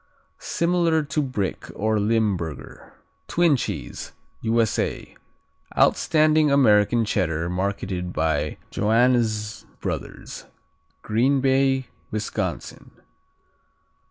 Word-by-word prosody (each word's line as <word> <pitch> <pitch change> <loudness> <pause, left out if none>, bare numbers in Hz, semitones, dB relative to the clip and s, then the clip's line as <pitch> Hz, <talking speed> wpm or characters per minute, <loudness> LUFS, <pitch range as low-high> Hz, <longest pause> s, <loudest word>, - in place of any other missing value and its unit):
Similar 170 -2 +1
to 145 +1 -1
Brick 130 -9 -3
or 110 0 +1
Limburger. 100 -7 -2 0.3
Twin 170 -4 +3
Cheese 125 - -5 0.3
U.S.A. 115 -1 0 0.6
Outstanding 155 -1 +4
American 115 -4 +4
Cheddar 85 -5 -1
marketed 95 -1 -2
by 80 -2 -1
Joannes 110 -1 +1 0.2
Brothers, - - -6 0.6
Green 130 +6 +2
Bay, 135 0 +2 0.2
Wisconsin. 110 0 -4
115 Hz, 75 wpm, -24 LUFS, 100-135 Hz, 0.6 s, Outstanding